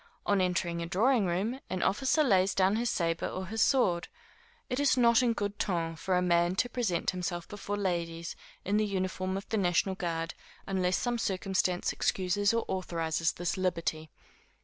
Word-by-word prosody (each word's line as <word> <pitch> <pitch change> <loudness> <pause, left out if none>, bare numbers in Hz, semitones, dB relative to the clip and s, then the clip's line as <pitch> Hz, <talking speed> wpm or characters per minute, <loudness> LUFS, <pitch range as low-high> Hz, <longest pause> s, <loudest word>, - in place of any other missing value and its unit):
On 200 -2 +2
entering 170 -2 0
a 170 - -3
drawing 215 +4 +2
room, 200 +9 -1
an 185 - -2
officer 265 +8 +2
lays 195 -6 +3
down 190 +2 +3
his 235 +1 0
sabre 165 -3 0
or 185 - -4
his 220 +4 -2
sword. 200 -9 +3 0.6
It 250 +1 -2
is 285 -2 +3
not 235 -1 +5
in 240 -2 +2
good 205 -2 -3
ton 165 -4 -1
for 180 +3 0
a 180 - +1
man 175 0 +2
to 245 - +1
present 215 -9 0
himself 175 -1 -4
before 205 0 -5
ladies, 170 -3 -2 0.3
in 200 +2 +1
the 215 - +2
uniform 185 -1 -2
of 195 - -7
the 220 - 0
national 190 0 +2
guard, 165 -3 -3 0.3
unless 185 -2 +1
some 240 -1 -1
circumstance 185 -3 0
excuses 200 +3 +1
or 230 0 0
authorises 165 -3 -1
this 175 +1 -2
liberty. 170 -4 -1
185 Hz, 175 wpm, -30 LUFS, 175-210 Hz, 0.6 s, not